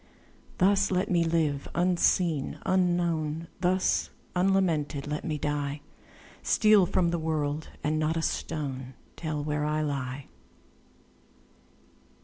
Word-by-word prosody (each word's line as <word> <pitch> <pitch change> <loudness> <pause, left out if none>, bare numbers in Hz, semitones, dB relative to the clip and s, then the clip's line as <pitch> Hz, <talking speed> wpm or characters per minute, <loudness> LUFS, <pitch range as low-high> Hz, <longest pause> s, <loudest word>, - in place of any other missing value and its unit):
Thus 195 +1 +3
let 185 0 0
me 170 -2 +3
live, 160 -4 0
unseen, 175 -3 +2
unknown; 170 -3 0
Thus 185 +1 +1 0.3
unlamented 175 -6 +1
let 150 +1 -3
me 155 -3 -2
die; 145 0 -2 0.6
Steal 210 -4 +4
from 170 -1 +1
the 170 - -1
world, 155 -1 -2
and 155 +1 +1
not 155 +1 0
a 165 - -1
stone 135 -6 -3 0.2
Tell 155 -3 -3
where 150 0 -1
I 150 +1 0
lie. 135 -2 -3
160 Hz, 115 wpm, -28 LUFS, 150-180 Hz, 0.6 s, Steal